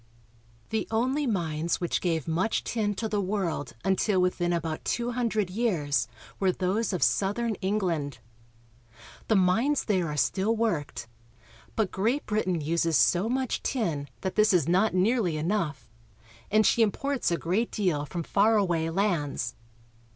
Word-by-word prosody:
The 220 - -1
only 260 +6 0
mines 170 -6 -1
which 175 - -1
gave 165 -4 -1
much 175 +8 0
tin 210 -3 -1
to 220 - -2
the 210 -1 0
world 185 -8 -2
until 190 +1 +2
within 180 -1 +1
about 165 -2 -2
two 240 0 -1
hundred 220 -6 -1
years 155 - 0 0.3
were 190 -1 +3
those 190 +5 -1
of 185 - 0
southern 220 +4 +1
England. 175 - -1 1.1
The 220 - +3
mines 225 +10 +2
there 185 -5 +1
are 150 0 -4
still 200 +9 +1
worked, 165 - -2 0.7
but 215 -4 0
Great 230 +9 0
Brit 210 -2 -1
ain 175 -3 0
uses 165 +1 +1
so 185 +5 +3
much 260 0 -1
tin 165 - -1
that 190 - -2
this 215 -1 +4
is 165 -5 +3
not 185 +4 +2
nearly 185 -3 +2
enough, 155 - -2 0.6
and 215 +1 +4
she 235 - +3
imports 270 +5 +1
a 170 - 0
great 190 +9 0
deal 180 -9 0
from 170 +1 -4
far 215 +6 +3
away 170 -5 +1
lands. 165 - -1
190 Hz, 150 wpm, -27 LUFS, 165-220 Hz, 1.1 s, this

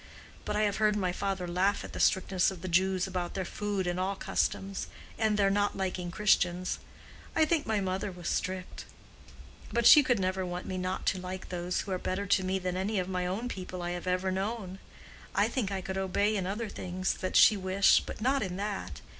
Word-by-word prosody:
But 210 - -2
I 210 - +2
have 205 -2 +1
heard 215 -1 +3
my 185 -3 0
father 190 0 -2
laugh 185 +4 +1
at - - -9
the - - -5
strictness 190 -1 +3
of 190 -3 -8
the - - -3
Jews 185 +1 +2
about 180 -2 -4
their 190 -1 -2
food 205 0 -2
and 175 0 -1
all 190 +2 0
customs, 195 0 -2 0.3
and 215 -2 +1
their 195 -1 +3
not 205 0 +1
liking 185 -2 -2
Christians. 185 -2 +1 0.6
I 315 - +5
think 310 -2 0
my 220 -1 +1
mother 190 +1 -2
was 180 -2 -8
strict; 185 0 -3 0.9
but 235 +1 +1
she 300 - +10
could 245 -5 +1
never 185 0 0
want 180 0 -4
me 185 -1 -3
not 185 +1 -3
to 190 - +1
like 185 +1 -6
those 180 0 -2
who 195 - -7
are 185 - -1
better 190 +3 -2
to 195 -1 +2
me 190 +1 0
than 180 -1 -3
any 195 +3 -1
of 180 -1 0
my 180 -1 -1
own 205 +7 -2
people 185 -5 -6
I 175 - -2
have 175 +1 -5
ever 185 +1 +1
known. 195 0 -3 0.6
I - - +4
think 225 -8 -2
I 195 -1 -2
could 190 +1 -3
obey 200 +3 +1
in 190 -3 -1
other 215 +4 -3
things 185 -1 -2
that 185 - -3
she 215 - +8
wished 190 0 +3
but - - -7
not 265 +4 +2
in 185 -3 -3
that. 180 - -4
190 Hz, 220 wpm, -30 LUFS, 185-205 Hz, 0.9 s, she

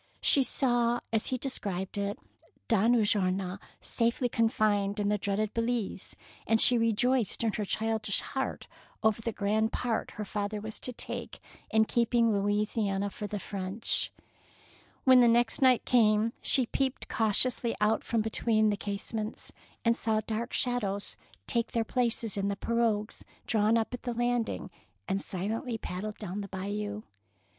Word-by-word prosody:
She 280 - +5
saw, 240 -2 +2
as 220 - +1
he 255 - -1
described 200 -8 -1
it, 200 0 -2 0.5
Don 225 +2 +4
Ulloa 195 -3 +1 0.2
safely 235 +3 +1
confined 215 -3 +1
in 205 0 +1
the 210 0 +1
dreaded 200 +2 -1
Belize, 230 -4 -2 0.3
and 225 +1 +3
she 245 - +8
rejoiced 230 0 +2
in 220 -2 +1
her 210 - -2
childish 220 0 0
heart 265 0 -4 0.4
over 220 0 +2
the 230 - -2
grand 215 +2 0
part 235 -3 -2
her 210 - -3
father 205 +1 -3
was 220 +1 -5
to 250 - -2
take 245 - -4 0.3
in 220 0 +4
keeping 235 0 +2
Louisiana 205 0 0
for 210 - -6
the 205 - -4
French. 195 +2 -1 0.9
When 260 -1 +7
the 240 - +6
next 235 +1 +2
night 255 -2 +4
came, 220 -1 +3
she 260 - +4
peeped 265 +2 -2
cautiously 230 +2 +1
out 210 +1 +2
from 230 -1 0
between 220 -1 +1
the 205 - -1
case 200 +2 -5
ments, 215 0 -4 0.3
and 230 0 +4
saw 220 -1 0
dark 230 +3 -3
figures 210 -6 -1 0.3
take 235 -2 -1
their 230 - +1
places 230 -3 -1
in 200 0 0
the 200 - -1
pirogues 225 -1 -1 0.2
drawn 220 0 +2
up 225 +2 -1
at 245 - -5
the 245 -2 -4
landing 240 -4 -1 0.4
and 195 +1 -1
silently 225 +6 -3
paddle 210 +1 -5
down 205 -1 -5
the 200 - -6
Bayou. 205 +2 -4
220 Hz, 155 wpm, -29 LUFS, 205-235 Hz, 0.9 s, she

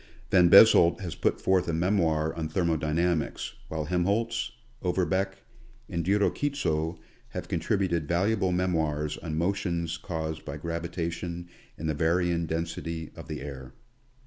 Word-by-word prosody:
Van 90 -2 +6
Bezold 85 -4 +8
has 90 -4 -4
put - - 0
forth 95 -1 +2
a 85 - -1
memoir 80 -3 +1
on 80 -2 -4
thermodynamics, 80 0 0
while 80 -1 -3
Helmholtz, 100 +8 0 0.3
Oberbeck, 95 +1 0 0.4
and 85 - -2
Diro 100 +4 +3
Kitso 85 - -1 0.3
have 90 -1 -6
contributed 85 -2 0
valuable 95 +3 +1
memoirs 80 -5 0
on 80 -3 -4
motions 85 -2 -1
caused 80 -3 -4
by 75 0 -6
gravitation 85 +1 -4 0.3
and 80 - -4
the 80 - +1
varying 85 +2 +1
den 80 +1 0
sity 80 -1 -6
of - - -10
the - - -5
air. 65 -2 -8
85 Hz, 135 wpm, -28 LUFS, 80-90 Hz, 0.4 s, Bezold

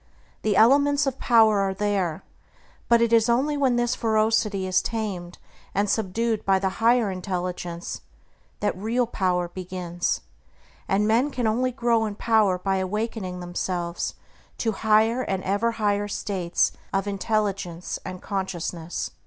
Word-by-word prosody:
The 210 -2 +1
elements 285 +5 +5
of 270 -1 -2
power 220 -4 +5
are 195 -1 0
there; 195 -4 -1 0.7
but 235 0 +5
it 235 0 +1
is 230 0 +4
only 270 +5 +2
when 270 -4 +2
this 240 0 +1
ferocity 220 -4 +1
is 185 0 +2
tamed 195 -6 -4 0.4
and 200 +1 +2
subdued 220 +2 0
by 195 -1 +3
the 190 0 -2
higher 230 -2 +4
intelligence 180 -2 -4 0.6
that 210 - 0
real 225 +6 0
power 180 -6 0
begins; 175 -1 -3 0.7
and 205 +2 +2
men 235 +6 +3
can 250 -4 -2
only 245 +4 +1
grow 235 -3 +1
in 210 -2 -4
power 215 -4 +2
by 190 +1 -1
awakening 190 -1 -3
themselves 175 -1 -3 0.4
to 225 - 0
higher 220 +3 +3
and 190 -6 -2
ever 205 +5 0
higher 205 -2 0
states 190 -4 0 0.2
of 195 0 0
intelligence 200 -3 -2
and 185 -1 -7
consciousness. 175 -3 -3
205 Hz, 140 wpm, -25 LUFS, 185-230 Hz, 0.7 s, elements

